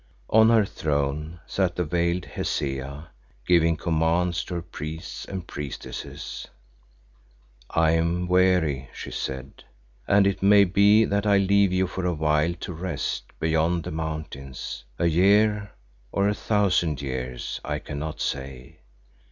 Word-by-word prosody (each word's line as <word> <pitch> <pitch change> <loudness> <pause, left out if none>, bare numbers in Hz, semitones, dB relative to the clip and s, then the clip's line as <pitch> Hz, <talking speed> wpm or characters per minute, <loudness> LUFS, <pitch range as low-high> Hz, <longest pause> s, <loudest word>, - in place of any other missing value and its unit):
On 110 +1 +6
her 115 -3 +5
throne 75 0 -2
sat 95 -3 0
the 90 - 0
veiled 85 +2 0
Hesea, 70 +2 -4 0.4
giving 85 -2 +4
commands 85 +1 +1
to 90 - -5
her 85 - -2
priests 80 -1 -7
and 95 -3 -6
priestesses. 75 -5 -7 1.2
"I 80 -1 +3
am 85 +2 +1
weary," 90 -7 +2
she - - -7
said, 65 +1 -5 0.4
"and 100 0 +5
it 100 -1 0
may 100 +1 +7
be 100 +4 +5
that 100 +1 0
I 100 -1 +5
leave 100 0 +3
you 95 0 +2
for 95 0 -5
a 90 - 0
while 75 +2 +1
to 90 - -5
rest 85 -2 -3
beyond 80 +2 +1
the - - -5
mountains. 75 -5 -5
A - - 0
year, 100 +4 +3 0.4
or 100 0 +1
a 105 - +2
thousand 95 - +1
years 65 -2 -4
I 75 0 -2
cannot 75 +1 -6
say. 65 -2 -5
85 Hz, 135 wpm, -25 LUFS, 75-95 Hz, 1.2 s, may